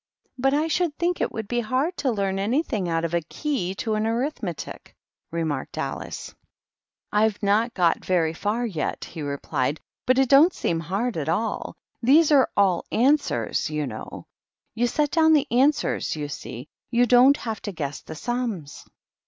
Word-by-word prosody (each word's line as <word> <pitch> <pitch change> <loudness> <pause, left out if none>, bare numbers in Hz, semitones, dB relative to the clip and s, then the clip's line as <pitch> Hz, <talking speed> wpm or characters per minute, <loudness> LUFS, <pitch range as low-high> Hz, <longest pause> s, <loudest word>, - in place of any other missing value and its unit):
" - - -51
But 270 +2 +2
I 305 +2 +1
should 325 -1 0
think 350 +1 0
it - - 0
would 220 -2 -5
be 240 +2 0
hard 255 +10 0
to 275 - 0
learn 195 -4 -1
anything 215 - 0
out 165 0 0
of 170 - -4
a 170 - +2
Key 190 - -3
to 220 +2 -2
an 215 +1 0
Arithmetic," 230 - -4 0.3
remarked 160 -5 -3
Alice. - - -4
"■» - - -21 0.4
" - - -64
I've 210 0 +2
not 215 +4 +2
got 175 -3 +2
very 165 -3 +1
far 210 +8 -1
yet," 185 -9 -3
he 160 - -8
replied^; 140 0 -2 0.2
" - - -69
but 255 0 +4
it 270 0 +4
don't 290 +7 +6
seem 165 - -1
hard 195 +7 -2
at 155 0 -2
all. 220 +7 -2 0.3
These 295 +6 +5
are 275 -3 +5
all 190 -4 +3
answers^ 275 - +1
you 150 -1 -2
know. 110 -5 -8 0.5
You 235 +2 +1
set 295 +4 0
down 320 -1 +5
the 295 -2 +4
answers, 270 - +2
you 150 -1 -4
see; 130 -1 -7 0.2
you 240 0 +3
don't 250 +4 +6
have 225 -2 -5
to 205 - -4
guess 145 -5 -5
the - - -9
sums." 225 - -4
220 Hz, 185 wpm, -24 LUFS, 170-265 Hz, 0.5 s, don't